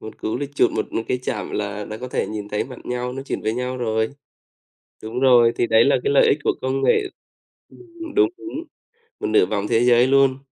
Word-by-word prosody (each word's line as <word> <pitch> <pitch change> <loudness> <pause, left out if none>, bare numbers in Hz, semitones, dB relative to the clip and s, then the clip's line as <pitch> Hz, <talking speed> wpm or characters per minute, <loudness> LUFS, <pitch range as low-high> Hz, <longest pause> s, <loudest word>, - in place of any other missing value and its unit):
một 110 - -10
cú 110 - -2
click 145 +2 -6
chuột, - - +3
một - - -3
một 115 - -1
cái 125 - 0
chạm - - -4
là 105 0 -3
là 110 - -7
có 125 +3 -7
thể - - -1
nhìn 105 -1 -6
thấy 105 - -2
mặt 125 -1 -10
nhau, 125 0 -3
nói 135 +1 -6
chuyện - - -3
với 110 - 0
nhau 125 +1 -3
rồi. 110 -2 -1 0.9
Đúng 115 +4 -4
rồi, 120 -3 +5
thì 120 - +1
đấy 110 +1 +5
là 140 - +4
cái - - +1
lợi 140 - +5
ích 145 - +3
của - - +3
công 130 +1 -1
nghệ 415 - +3 0.7
ừm, 340 -3 -11
đúng, 405 -3 +4
đúng, 335 -3 -7 0.6
một - - -2
nửa 110 -4 +4
vòng 105 0 -2
thế 115 0 +2
giới 120 0 +5
luôn. 135 -1 +3
125 Hz, 235 wpm, -21 LUFS, 110-135 Hz, 0.9 s, rồi